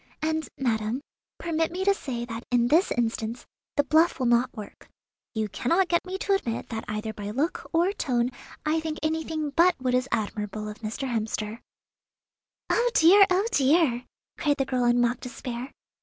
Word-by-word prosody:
And, 315 Hz, -1 st, -1 dB
madam, 230 Hz, -1 st, -1 dB, 0.4 s
permit 325 Hz, -1 st, -1 dB
me 370 Hz, +2 st, -3 dB
to 400 Hz, -, +5 dB
say 245 Hz, -10 st, -4 dB
that 230 Hz, 0 st, -6 dB
in 240 Hz, -1 st, +3 dB
this 330 Hz, +7 st, +4 dB
instance 230 Hz, 0 st, -2 dB, 0.3 s
the 290 Hz, -, +5 dB
bluff 315 Hz, +4 st, +3 dB
will 255 Hz, -, -1 dB
not 240 Hz, +1 st, +3 dB
work. 210 Hz, -, -10 dB, 0.5 s
You 220 Hz, -1 st, 0 dB
cannot 340 Hz, -, +1 dB
get 345 Hz, +1 st, +1 dB
me 375 Hz, +1 st, -3 dB
to 400 Hz, +1 st, 0 dB
admit 235 Hz, -12 st, -2 dB
that 225 Hz, -1 st, -4 dB
either 215 Hz, +1 st, -3 dB
by 205 Hz, -1 st, -6 dB
look 285 Hz, -, -2 dB
or 345 Hz, +4 st, +2 dB
tone 250 Hz, -8 st, 0 dB, 0.3 s
I 310 Hz, +1 st, +2 dB
think 315 Hz, -1 st, -4 dB
anything 315 Hz, -1 st, -1 dB
but 345 Hz, +5 st, +4 dB
what 255 Hz, -1 st, -1 dB
is 255 Hz, +1 st, +1 dB
admirable 215 Hz, -1 st, -2 dB
of 210 Hz, 0 st, -7 dB
Mr. 225 Hz, +5 st, -4 dB
Hemster." 220 Hz, -1 st, -2 dB, 1.1 s
"Oh, 485 Hz, +1 st, +3 dB
dear, 390 Hz, +5 st, +8 dB
oh, 370 Hz, +3 st, +2 dB
dear!" 270 Hz, -3 st, +3 dB, 0.3 s
cried 295 Hz, -3 st, +2 dB
the 270 Hz, -, +1 dB
girl 250 Hz, -1 st, 0 dB
in 240 Hz, 0 st, +4 dB
mock 240 Hz, 0 st, +2 dB
despair. 250 Hz, 0 st, -6 dB
255 Hz, 175 wpm, -26 LUFS, 235-320 Hz, 1.1 s, dear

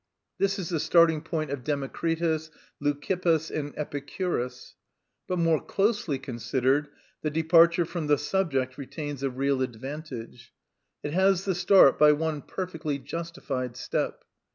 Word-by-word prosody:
This 195 Hz, 0 st, +1 dB
is 185 Hz, -5 st, -4 dB
the 165 Hz, -3 st, 0 dB
starting 160 Hz, 0 st, +4 dB
point 155 Hz, -3 st, -3 dB
of 140 Hz, -3 st, -4 dB
Democritus, 160 Hz, +3 st, -1 dB, 0.3 s
Leucippus, 160 Hz, +2 st, 0 dB
and 145 Hz, -1 st, -4 dB
Epicurus. 145 Hz, -3 st, -3 dB, 0.5 s
But, 180 Hz, -, -1 dB
more 165 Hz, -2 st, +2 dB
closely 200 Hz, -, 0 dB
considered, 130 Hz, +2 st, 0 dB, 0.3 s
the 155 Hz, -, 0 dB
departure 165 Hz, +2 st, +4 dB
from 165 Hz, -2 st, -4 dB
the 145 Hz, 0 st, +4 dB
subject 145 Hz, -5 st, -1 dB
retains 145 Hz, 0 st, -6 dB
a 135 Hz, -, 0 dB
real 135 Hz, +1 st, 0 dB
advantage; 125 Hz, -1 st, -6 dB, 0.5 s
it 150 Hz, -, -3 dB
has 190 Hz, +1 st, +3 dB
the 190 Hz, -, +1 dB
start 180 Hz, -5 st, +6 dB
by 150 Hz, 0 st, +7 dB
one 155 Hz, -1 st, -2 dB
perfectly 165 Hz, -5 st, -4 dB
justified 140 Hz, -4 st, -5 dB
step. -, -, -2 dB
150 Hz, 130 wpm, -27 LUFS, 135-170 Hz, 0.5 s, by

